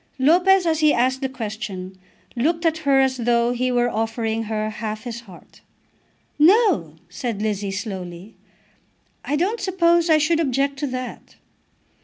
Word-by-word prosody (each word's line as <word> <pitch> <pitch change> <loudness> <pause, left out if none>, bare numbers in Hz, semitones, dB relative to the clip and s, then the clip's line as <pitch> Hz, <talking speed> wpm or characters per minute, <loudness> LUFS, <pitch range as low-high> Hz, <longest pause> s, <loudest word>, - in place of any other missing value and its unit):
Lopez, 355 +7 +4
as 320 -2 +1
he 305 -1 +4
asked 260 +2 +1
the 265 - -1
question, 215 -6 -6 0.4
looked 330 +8 0
at 320 -1 +1
her 280 -3 +3
as 265 -1 +2
though 235 0 +1
he 250 +1 -1
were 245 0 +2
offering 225 0 -2
her 215 0 -2
half 215 0 -5
his 235 -2 -6
heart. 195 -7 -16 0.8
"No," 330 - +4
said 220 +4 -4
Lizzie, 205 -2 -2
slowly, 190 -1 -6 0.9
"I 290 - -1
don't 390 +9 -1
suppose 345 -3 +2
I 315 - +6
should 320 +2 +2
object 275 -2 0
to 290 - -1
that." 255 -1 -7
250 Hz, 150 wpm, -22 LUFS, 220-315 Hz, 0.9 s, I